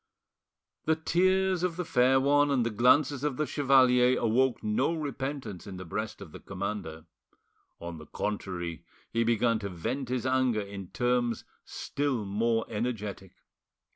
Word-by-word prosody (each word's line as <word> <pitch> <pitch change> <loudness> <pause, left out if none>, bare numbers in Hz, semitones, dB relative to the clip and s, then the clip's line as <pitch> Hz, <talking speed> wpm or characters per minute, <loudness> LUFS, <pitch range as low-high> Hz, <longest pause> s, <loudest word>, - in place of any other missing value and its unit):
The 160 - +3
tears 185 +3 +2
of 180 -2 0
the 180 0 -3
fair 130 0 +4
one 145 +2 +3
and 130 -4 +2
the 115 - -1
glances 130 +5 +3
of 145 -4 -1
the 150 - +1
chevalier 130 -3 +4
awoke 120 +3 +1
no 125 +10 +1
repentance 135 - -5
in 95 -2 -7
the 95 - -7
breast 105 +6 -4
of 90 -6 -10
the - - -10
commander; 95 -5 -5 0.7
on 85 -1 -7
the 75 - -12
contrary, 90 -5 -4 0.3
he 115 0 +1
began 115 0 +2
to 100 -2 -4
vent 115 +9 -4
his 125 -1 -2
anger 130 -4 +2
in 100 -2 -7
terms 120 +3 0 0.2
still 140 -7 -2
more 115 +3 0
energetic. 105 -4 -4
120 Hz, 150 wpm, -29 LUFS, 100-135 Hz, 0.7 s, fair